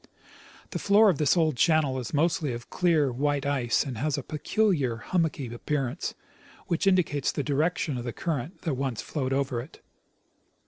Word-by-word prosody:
The - - -3
floor 205 +1 +5
of 155 - -5
this 150 +3 +3
old 160 -4 +2
channel 145 -2 +2
is 120 - -5
mostly 155 -2 +1
of 120 0 -8
clear, 160 -7 +2
white 140 +2 0
ice, 135 -5 +1
and 125 -5 -5
has 150 +2 0
a 140 - -4
peculiar, 155 - 0
hummocky 145 -3 -1
appearance, 135 +3 -2 0.5
which 170 +2 0
indicates 160 -7 +2
the 145 - -2
direction 150 -1 0
of - - -5
the 120 - -3
current 160 - -4
that 160 - -1
once 130 -4 -3
flowed 135 -4 -3
over 135 -3 0
it. 140 +9 -13
145 Hz, 170 wpm, -27 LUFS, 130-165 Hz, 0.5 s, floor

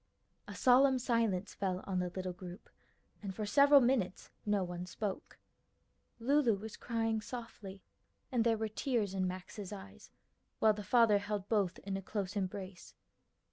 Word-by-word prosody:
A - - -7
solemn 260 +1 +5
silence 230 -6 0
fell 185 -2 -2
on 190 -2 -1
the 180 0 -1
little 185 0 -4
group, 180 +2 -10 0.5
and 195 -3 -5
for 215 - -3
several 280 +6 +7
minutes 240 -7 0 0.2
no 205 -2 +2
one 175 0 -5
spoke. 200 +1 -5 0.8
Lulu 255 -1 +3
was 215 +2 -8
crying 225 -2 -1
softly, 215 -5 -8 0.5
and 240 -3 +2
there 225 -1 +2
were 220 0 -1
tears 215 -2 -1
in 185 -1 0
Max's 185 +2 -6
eyes, 95 - -10 0.5
while 220 -1 +5
the 210 - -6
father 215 0 +5
held 205 -1 -4
both 200 -5 +1
in 195 -1 -3
a - - -5
close 200 0 -4
embrace. 190 -1 -5
205 Hz, 155 wpm, -34 LUFS, 185-230 Hz, 0.8 s, several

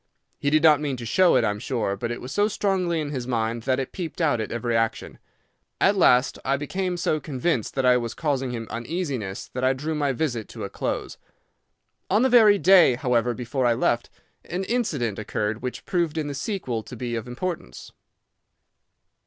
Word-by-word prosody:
He 145 - +1
did 155 +2 +3
not 150 -3 +6
mean 140 -3 -2
to 120 - -7
show 185 +9 +4
it, 125 - +4
I 105 - +2
am 105 - -5
sure, 115 -4 -2
but 115 +4 -4
it 120 - -4
was 125 - -7
so 205 +5 +2
strongly 190 -5 0
in 150 -2 -3
his 125 -4 -4
mind 115 -1 -1
that 130 - +2
it 135 - -4
peeped 175 -2 -6
out 145 -9 +2
at 110 - -5
every 120 0 -1
action. 115 -1 -1 0.6
At 200 - +4
last 130 -8 +4
I 135 +1 +1
became 180 +5 -2
so 155 -3 0
convinced 135 -4 -2
that 135 -1 0
I 125 0 +6
was 120 -2 -4
causing 135 -5 -1
him 115 -2 -4
uneasiness 120 - -4
that 125 - -3
I 130 +1 +4
drew 150 +4 -3
my 145 -2 0
visit 125 -6 -2
to - - -8
a - - -5
close. - - -4 0.9
On 210 +5 +3
the 260 - +4
very 220 -4 +7
day, 185 -9 +6
however, 120 -1 +1
before 125 +1 -1
I 120 - +3
left, 120 -1 0 0.4
an 180 +2 -3
incident 155 - -1
occurred 105 +1 -2
which 125 0 -5
proved 170 -3 -1
in 155 - -1
the 145 - -4
sequel 140 - -3
to 125 - -10
be 120 0 -4
of 115 +1 -4
importance. 125 - -5
130 Hz, 200 wpm, -24 LUFS, 120-170 Hz, 0.9 s, very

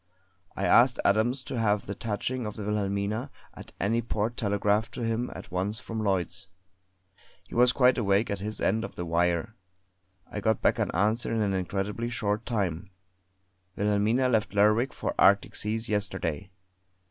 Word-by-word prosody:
I 100 - -1
asked 120 +7 +5
Adams 120 +6 +2
to 130 - -4
have 105 -2 +1
the 100 - -4
touching 115 +3 -3
of 105 - -6
the 105 - -6
Wilhelmina 105 +4 -1 0.2
at - - -11
any 115 +4 +1
port 115 0 -2
telegraphed 105 +1 0
to 120 - -4
him 115 +2 -1
at - - -10
once 95 +4 -2
from 115 -1 -5
Lloyds. 95 -2 -1 1.0
He - - -15
was 125 +1 +5
quite 125 0 +4
awake 100 0 +2
at 100 - -2
his 105 +2 -5
end 110 +4 +1
of - - -7
the 85 - -4
wire; 85 +3 0 0.7
I 105 - -6
got 110 +1 +1
back - - +2
an - - 0
answer 110 +7 0
in 115 - 0
an 100 -2 +1
incredibly 100 +5 -2
short 105 -2 -2
time: 95 -5 -2 0.9
"Wilhelmina 105 +5 +2
left 110 -4 0
Lerwick 105 +5 +3
for - - -3
Arctic 100 0 +4
seas 110 +2 -2
yesterday." 95 -5 -2
105 Hz, 165 wpm, -28 LUFS, 100-115 Hz, 1.0 s, asked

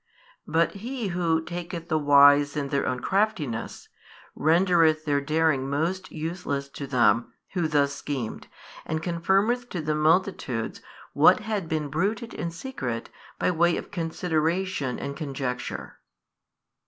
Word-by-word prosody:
But 165 +1 +2
He 230 +1 -4
Who 170 -2 +1
taketh 170 0 -6
the 155 -2 +1
wise 145 0 +6
in 140 -2 -2
their 140 0 0
own 125 -1 -2
craftiness, 190 - -1 0.5
rendereth 165 -1 +3
their 145 -2 +1
daring 150 -2 +1
most 170 +6 -2
useless 155 -4 -4
to 140 0 -7
them 120 -3 +3 0.2
who 175 -4 +1
thus 145 -2 +2
schemed, 135 -5 -5 0.4
and 160 0 -3
confirmeth 195 +8 +1
to 180 - -4
the 155 -1 -1
multitudes 155 - 0 0.3
what 160 +8 +6
had 210 -6 -3
been 155 -2 -1
bruited 205 - -1
in 170 - -3
secret 165 - -5 0.3
by - - +1
way 170 0 +2
of - - -7
consideration 165 -3 -1
and 140 - -5
conjecture. 135 -5 -5
160 Hz, 130 wpm, -26 LUFS, 140-180 Hz, 0.5 s, wise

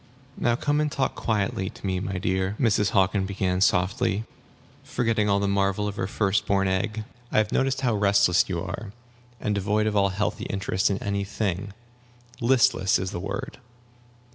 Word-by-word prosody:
"Now 120 -1 +1
come 145 +4 0
and 150 -1 0
talk 135 -2 0
quietly 100 -3 -1
to - - -11
me, 95 -1 0
my 95 0 -3
dear," 95 +2 -1
Mrs. 105 -5 +2
Hockin 95 0 +2
began, 95 -2 -1
most 95 - +5
kindly, 95 +2 0 0.6
forgetting 115 -3 0
all 100 0 +3
the 100 - 0
marvel 100 +1 +1
of 100 - -4
her 95 - -1
first 105 0 0
born 95 -1 +2
egg. 105 +4 -1 0.3
"I - - 0
have 110 0 +2
noticed 135 0 +1
how 125 -3 +1
restless 100 -3 +3
you 85 -2 -2
are, 100 +3 -6 0.5
and 105 - -1
devoid 105 +2 +1
of 110 -1 0
all 100 -1 +3
healthy 105 +3 -2
interest 95 -1 0
in 100 - 0
any 100 0 -1
thing. 100 -1 -3 0.7
'Listless' 115 -6 +3
is 95 0 -3
the - - -4
word. 100 +5 -5
100 Hz, 180 wpm, -25 LUFS, 95-110 Hz, 0.7 s, most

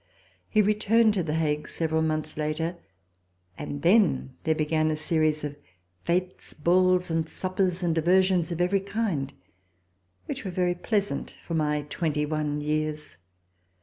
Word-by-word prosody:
He 215 -1 +4
returned 215 +2 +3
to 195 - 0
The 155 -2 -2
Hague 150 -2 0
several 160 -1 0
months 155 -1 -1
later, 155 +3 -2 0.8
and 145 +4 -6
then 170 - +3
there 160 -1 +2
began 155 0 +1
a 155 - 0
series 155 -1 0
of 145 -1 -4 0.5
fetes, 180 +1 -2
balls 180 +2 +3
and 165 0 0
suppers, 185 -1 -1
and 170 -2 +2
diversions 180 +1 +3
of 170 - -3
every 180 +3 +2
kind, 195 -9 -2 0.9
which - - -5
were 190 - -4
very 180 0 +1
pleasant 200 -3 -2
for 170 - -5
my 150 -2 0
twenty 150 0 -1
one 150 -1 -2
years. 150 - -2
165 Hz, 145 wpm, -27 LUFS, 155-185 Hz, 0.9 s, He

